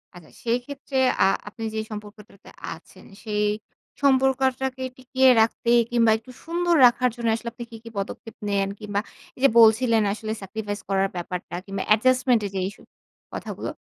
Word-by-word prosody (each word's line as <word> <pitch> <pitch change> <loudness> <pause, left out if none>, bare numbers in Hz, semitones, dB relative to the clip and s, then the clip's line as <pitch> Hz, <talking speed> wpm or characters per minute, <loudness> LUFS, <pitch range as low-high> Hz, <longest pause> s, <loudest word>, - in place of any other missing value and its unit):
আচ্ছা 175 -3 -14
সেইক্ষেত্রে 255 +4 -3 0.3
আ - - +6 0.2
আপনি 225 +2 -8
যে - - -1
সম্পর্কটাতে 210 -1 -11 0.2
আছেন - - -16 0.2
সেই 210 -1 0 0.6
সম্পর্কটাকে 265 -1 +2
টিকিয়ে 260 0 +3
রাখতে 230 +1 0 0.2
কিংবা 230 -2 +4
একটু 240 +3 -14
সুন্দর 345 +1 +1
রাখার 250 +1 +4
জন্য 235 -1 -3
আসলে 235 +1 -5
আপনি 240 - -7
কি 225 - -8
কি 230 - -9
পদক্ষেপ 200 +3 -5
নেন? 195 -1 +1
কিংবা 205 -2 -2 0.4
এই - - -17
যে 275 - +7
বলছিলেন 225 0 +5
আসলে 215 0 -5
স্যাক্রিফাইস 205 +1 -5
করার 195 0 +2
ব্যাপারটা 175 0 -5
কিংবা 195 -1 -4
এডজাস্টমেন্ট 250 0 +3
এর - - -3
যে-ই 190 +1 -1
সব - - -18 0.5
কথাগুলো - - -5
230 Hz, 155 wpm, -24 LUFS, 205-255 Hz, 0.6 s, যে